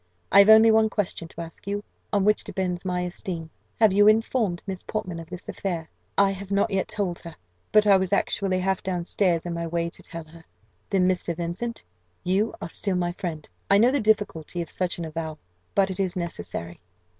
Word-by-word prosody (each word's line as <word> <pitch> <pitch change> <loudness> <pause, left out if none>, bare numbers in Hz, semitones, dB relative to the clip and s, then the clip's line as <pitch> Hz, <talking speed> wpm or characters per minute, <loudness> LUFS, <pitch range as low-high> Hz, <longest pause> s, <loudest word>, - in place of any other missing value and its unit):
I - - +8
have 200 +1 +7
only 220 +1 +9
one 220 0 +4
question 190 -5 -2
to 165 - -9
ask 165 +3 -10
you, 205 +1 -2 0.3
on 200 -2 +2
which 210 0 +3
depends 180 -2 -3
my 180 -1 -1
esteem 175 -2 -5 0.3
have 220 -4 +5
you 205 +1 +6
informed 215 -4 +2
Miss 190 -2 -4
Portman 180 -6 -4
of 165 - -10
this 180 0 -8
affair?" 170 -5 -4 0.3
"I 200 0 +5
have 195 0 -7
not 200 0 +1
yet 195 -1 0
told 195 -5 -2
her, 170 -2 -10 0.4
but 215 0 +5
I 200 -2 +7
was 190 -1 -1
actually 195 -1 +1
half 190 +1 0
down 180 -3 -2
stairs 175 -4 +1
in 175 - -3
my 170 0 -3
way 170 0 -1
to - - -11
tell 165 -1 -5
her." 165 +1 -16 0.5
"Then, 190 -3 +3
Mr. 180 -2 0
Vincent, 175 +8 -4 0.4
you 195 +5 +1
are - - -5
still 195 +2 -1
my 175 -1 0
friend. 170 -5 -5 0.2
I 200 - +6
know 235 +5 +5
the 285 - +1
difficulty 205 - 0
of 165 - -12
such 180 -1 -2
an 170 - -4
avowal 160 -1 -5 0.4
but 195 -1 +3
it 190 - -5
is 190 -2 0
necessary." 165 - -5
185 Hz, 210 wpm, -25 LUFS, 170-200 Hz, 0.5 s, only